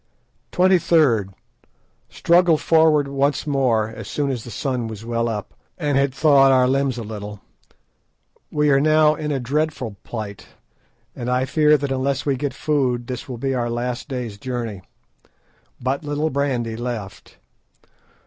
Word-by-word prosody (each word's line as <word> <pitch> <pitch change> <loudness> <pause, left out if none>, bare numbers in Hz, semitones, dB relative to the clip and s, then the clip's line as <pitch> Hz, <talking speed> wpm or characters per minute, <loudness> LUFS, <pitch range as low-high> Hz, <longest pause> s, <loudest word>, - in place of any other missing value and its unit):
"23rd.—Struggled 165 - +1
forward 160 -3 +3
once 140 +2 0
more 130 -7 +1
as 110 -2 -9
soon 145 -2 -1
as 120 -4 -4
the - - -9
sun 125 0 -2
was 110 0 -8
well 115 0 -1
up, 105 -2 -5 0.2
and 145 -5 -1
had 140 0 +2
thawed 135 -1 +5
our 130 -1 +4
limbs 135 -1 0
a 115 - -4
little. 105 -1 -7 1.1
We 150 -1 +2
are 135 - +5
now 155 +1 +4
in 150 -1 -4
a 140 - 0
dreadful 130 -4 -2
plight, 105 -4 -7 0.7
and 120 0 -4
I 125 +1 +1
fear 150 +1 +4
that 140 -1 -3
unless 135 +1 -1
we 140 -2 +1
get 140 +2 -3
food 130 -5 0
this 125 +1 -6
will 125 - -5
be 135 +3 -2
our 120 -2 -1
last 120 +1 -3
day's 120 -6 -5
journey. 115 -5 -4 1.0
But 135 +4 -2
little 150 +1 -1
brandy 130 -5 -1
left. 115 -4 -6
130 Hz, 150 wpm, -21 LUFS, 120-145 Hz, 1.1 s, thawed